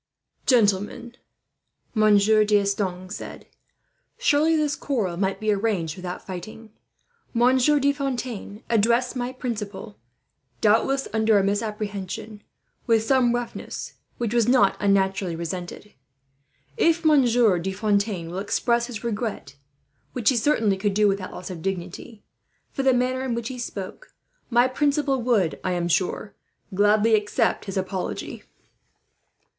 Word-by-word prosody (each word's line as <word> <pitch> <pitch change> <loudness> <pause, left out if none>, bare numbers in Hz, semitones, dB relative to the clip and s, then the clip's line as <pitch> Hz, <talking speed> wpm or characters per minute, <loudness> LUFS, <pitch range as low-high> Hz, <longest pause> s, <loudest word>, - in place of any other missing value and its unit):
"Gentlemen," 210 0 +2 0.8
Monsieur 215 0 +4
D'Estanges 200 -3 0
said, - - -9 0.7
"surely 310 +3 +3
this 300 -2 +1
quarrel 220 -11 -2
might 190 +2 -1
be 215 0 +1
arranged 195 -7 -1
without 180 -1 -7
fighting. 215 +4 -8 0.6
Monsieur 255 +5 +4
de 280 +1 +2
Fontaine 250 -7 -4
addressed 235 +3 +2
my 245 0 -2
principal, 215 -4 -6 0.6
doubtless 250 +6 +2
under 220 -1 +3
a 195 - +3
misapprehension, 205 0 -3 0.5
with 225 -2 +3
some 245 -1 +3
roughness, 240 -1 -5 0.2
which 235 -2 -2
was 235 -2 +3
not 240 -6 +4
unnaturally 195 -3 +1
resented. 175 +4 -6 0.8
If 335 -5 +2
Monsieur 245 - +4
de 190 +3 -3
Fontaine 200 -4 -1
will 180 - -4
express 235 +4 0
his 230 -3 -7
regret, 215 - -4 0.6
which 235 - +2
he 265 - +2
certainly 220 -5 +2
could 200 0 -1
do 210 0 +4
without 195 -1 -1
loss 185 - -7
of 170 -3 -7
dignity, 195 +4 -5 0.5
for - - -3
the 265 -1 +4
manner 255 +1 0
in 260 -3 -2
which 235 -1 -4
he 255 -1 -7
spoke; 210 - -7 0.3
my 240 0 +4
principal 280 0 0
would, 220 -9 +1
I 185 - 0
am 175 -1 -1
sure, 185 +4 -1 0.4
gladly 210 +3 +3
accept 210 -1 +1
his 195 -1 -5
apology." 190 0 -4
215 Hz, 130 wpm, -24 LUFS, 195-245 Hz, 0.8 s, Monsieur